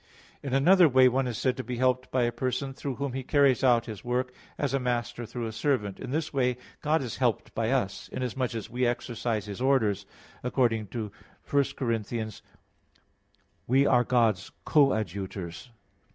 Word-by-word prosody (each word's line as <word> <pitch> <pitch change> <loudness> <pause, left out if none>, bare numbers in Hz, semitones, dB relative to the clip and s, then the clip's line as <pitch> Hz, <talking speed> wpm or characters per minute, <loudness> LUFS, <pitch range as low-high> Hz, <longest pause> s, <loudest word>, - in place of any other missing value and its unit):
In 135 -2 -2
another 175 +5 +6
way 130 0 +6
one 130 +1 +1
is 120 -3 -3
said 130 -2 +1
to - - -3
be 125 +1 -4
helped 130 0 +1
by 130 -1 +1
a 120 - +1
person 130 +3 -2
through 135 0 -4
whom 140 -1 -3
he 135 - -2
carries 140 -1 +3
out 120 -3 +4
his 110 -4 -8
work, 125 +1 -1 0.2
as 140 -2 -1
a 135 - +2
master 120 -1 -2
through 120 +1 -4
a 110 - -3
servant. 110 -4 -1
In - - -6
this 155 +3 -2
way 125 -2 +1 0.2
God 150 -1 +1
is 120 - -5
helped 120 -5 0
by 115 0 0
us; 120 -7 -1
inasmuch 125 -1 -2
as 110 -2 -4
we 125 +2 0
execute 120 -2 -2
His 100 +2 -7
orders, 110 -7 +2 0.4
according 120 -4 +1
to 105 0 -5 0.4
1 140 0 +3
Cor. 130 -4 -1
3:9: 110 0 -3 1.3
"We 135 +3 +4
are 125 -3 +4
God's 115 -6 +2 0.2
co 145 -3 +5
adjutors." 100 +1 -4
125 Hz, 180 wpm, -28 LUFS, 115-130 Hz, 1.3 s, another